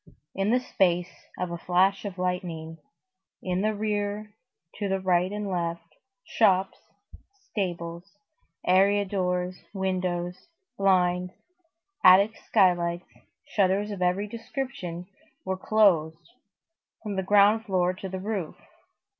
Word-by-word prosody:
In 195 +1 -1
the 250 +3 +4
space 180 -7 -1
of 180 -1 -3
a 170 - -5
flash 190 +4 +2
of 195 -2 -5
lightning, 175 -3 -3 0.6
in 185 0 -1
the 215 +1 0
rear, 210 0 -2 0.5
to 205 - -1
right 185 -1 +1
and 210 0 -4
left, 170 -3 -3 0.3
shops, 190 -3 +2 0.7
stables, 175 -1 -4 0.5
area 200 +2 +4
doors, 180 -2 -2
windows, 180 - -2 0.3
blinds, 180 -3 +2 0.7
attic 200 +4 +7
skylights, 175 -3 +1 0.3
shutters 200 +1 +1
of 200 -3 -6
every 180 +3 +1
description 225 -6 -6 0.4
were 190 0 -1
closed, 170 -6 +2 0.7
from 210 -2 -4
the 190 - 0
ground 205 +3 +4
floor 180 -2 +1
to 190 +1 -7
the 190 - -4
roof. 195 -5 -4
185 Hz, 115 wpm, -26 LUFS, 180-205 Hz, 0.7 s, attic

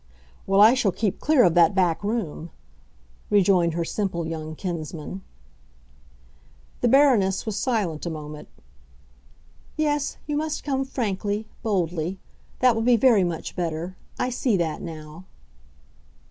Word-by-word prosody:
"Well, 195 +1 +4
I 220 +3 +8
shall 235 -7 +1
keep 195 +2 -2
clear 300 -4 +4
of 175 - +4
that 175 +2 +4
back 180 -2 +1
room!" 200 -7 -3 0.8
rejoined 180 -5 +3
her 170 -1 -1
simple 180 -3 -2
young 160 -1 -5
kinsman. 170 +1 -5 1.6
The 245 - +2
Baroness 235 -8 +4
was 220 -3 -3
silent 200 - -1
a - - -1
moment. 150 -1 -8 1.3
"Yes, 295 -2 0
you 295 - -2
must 310 0 -2
come 270 -2 -1
frankly—boldly. 200 - -2 0.4
That 250 -1 +5
will 225 - -1
be 240 +1 +4
very 230 -5 +5
much 170 -2 -4
better. 170 +1 -3 0.2
I 255 - -1
see 240 -3 +1
that 160 -3 -2
now." 160 0 -9
190 Hz, 130 wpm, -24 LUFS, 170-235 Hz, 1.6 s, I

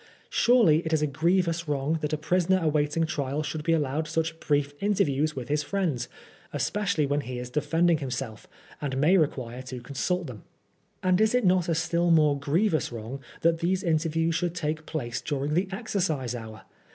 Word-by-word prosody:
Surely 230 -11 +5
it 160 - -2
is 155 -1 +2
a - - +4
grievous 170 +3 +1
wrong 145 +2 0
that 150 0 -2
a 155 - 0
prisoner 180 +4 +2
awaiting 155 +1 +1
trial 145 -2 -2
should 155 +1 -4
be 165 +2 0
allowed 155 -1 0
such 160 0 -2
brief 145 -1 0
interviews 155 -7 +1
with 125 -2 -5
his 150 +1 +1
friends, 150 -7 -2 0.4
especially 200 -7 0
when 145 +1 0
he 125 -2 -6
is 125 0 -6
de 150 - 0
fending 165 +2 +2
himself, 125 -4 -5 0.3
and 135 -3 -2
may 155 +7 +4
require 130 -7 0
to 130 -1 -7
consult 155 +8 -2
them. 115 - -8 0.6
And 185 +2 +3
is 220 +2 +3
it 250 -4 +2
not 180 -1 +3
a 165 - +2
still 170 +1 +1
more 155 -3 +5
grievous 160 +4 +1
wrong 120 +4 -6 0.2
that 165 0 +3
these 185 +2 0
interviews 165 0 +1
should 175 +1 -1
take 155 -2 -3
place 120 -7 -3
during 145 0 -2
the 180 +4 +1
exercise 160 - -1
hour 110 -2 -8
155 Hz, 185 wpm, -27 LUFS, 140-170 Hz, 0.6 s, Surely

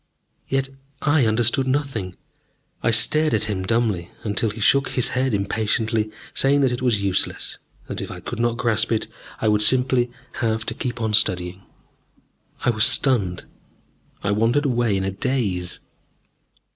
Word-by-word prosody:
Yet 135 0 0 0.3
I 145 -5 +3
understood 120 +4 +2
nothing. 130 -10 -2 0.7
I - - +1
stared 120 +6 +4
at 110 - +1
him 105 -3 -2
dumbly, 105 -4 0
until 105 +1 +1
he 110 +2 -7
shook 135 +6 +4
his 125 - 0
head 130 +1 0
impatiently, 110 +2 0 0.2
saying 140 +1 +3
that 135 -2 +3
it 125 - -3
was 115 -6 +1
useless, 95 -2 -1 0.3
that - - -5
if - - -6
I - - -7
could 120 - -6
not 120 0 0
grasp 115 -2 0
it 110 - +1 0.4
I 110 - +1
would 105 0 +3
simply 125 +1 +3 0.3
have 110 -1 0
to - - -3
keep 120 -1 -4
on 110 -1 -1
studying. 90 -3 +2 1.0
I 120 - +4
was 110 -2 +2
stunned. 100 -10 +2 0.8
I 100 - 0
wandered 115 +8 +2
away 120 -6 +1
in 95 - -2
a 95 - -1
daze. 95 -6 -2
115 Hz, 160 wpm, -22 LUFS, 105-125 Hz, 1.0 s, stared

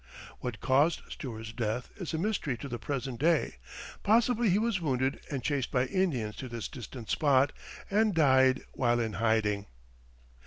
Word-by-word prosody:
What 120 -5 -5
caused 145 +6 +3
Stuart's 110 -4 -6
death 115 +1 -3
is 180 -5 -5
a 160 - -1
mystery 170 - -1
to 140 - -7
the 120 -3 -5
present 125 +1 -3
day; 160 - +2 0.4
possibly 235 +1 +3
he 185 - +4
was 220 -3 0
wounded 135 -3 0
and 135 -4 -3
chased 140 -2 0
by 125 -1 +1
Indians 135 - 0
to 130 - -6
this 115 -2 -4
distant 120 -2 -9
spot, 140 -2 +3 0.4
and 210 -1 +2
died 130 -4 +4
while 120 -1 +2
in 110 -2 -1
hiding. 110 -3 +1
130 Hz, 160 wpm, -30 LUFS, 120-165 Hz, 0.4 s, he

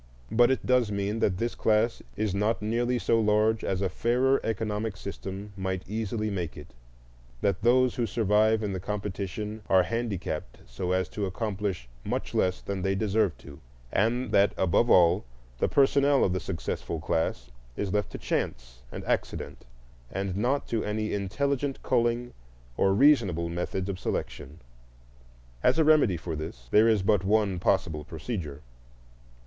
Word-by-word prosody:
But 120 +1 +5
it 130 - 0
does 125 -4 +3
mean 100 +2 -1
that 95 -4 +1
this 115 +4 -1
class 110 +2 +1
is 105 -3 -1
not 105 +3 +1
nearly 120 +3 0
so 115 -1 +2
large 110 +1 +2
as 95 0 -1
a - - +2
fairer 125 +8 +2
economic 110 -2 -2
system 100 +1 -7
might 95 -1 -3
easily 110 0 -2
make 90 -5 -4
it, 75 -4 -11 0.7
that 100 - 0
those 125 +2 +4
who 120 -2 0
survive 110 +1 +2
in 100 -2 -2
the 95 - -3
competition 105 +2 -4
are 95 -1 +5
handicapped 100 - -3
so 90 -1 -4
as 95 -1 +1
to 105 -2 -3
accomplish 100 - -3 0.2
much - - -3
less 90 0 +1
than 100 -1 -4
they 95 +1 0
deserve 105 -3 +1
to, 70 -1 -13 0.3
and 120 +5 +1
that, 100 +1 +4
above 95 +6 +2
all, 90 +2 +5 0.4
the - - +2
personnel 140 0 +4
of 90 - +2
the 95 - -1
successful 85 -2 -4
class 75 -7 -2 0.3
is 100 -2 -2
left 105 -1 0
to - - -4
chance 60 +1 -3
and - - -7
accident, - - -3 0.4
and 95 -1 -3
not 125 +8 0
to 115 -2 -1
any 105 +1 -2
intelligent 135 +8 -1
culling 120 0 0 0.4
or 95 - +3
reasonable 100 - +4
methods 90 +2 -3
of 95 -2 -4
selection. 75 -2 -4 1.0
As - - +3
a 160 - +5
remedy 150 - +4
for 80 0 -5
this, 65 -6 -7
there 110 +2 +6
is 110 -4 +3
but 100 -1 +3
one 100 -2 +2
possible 85 -4 0
procedure. 80 - -6
105 Hz, 160 wpm, -28 LUFS, 95-115 Hz, 1.0 s, there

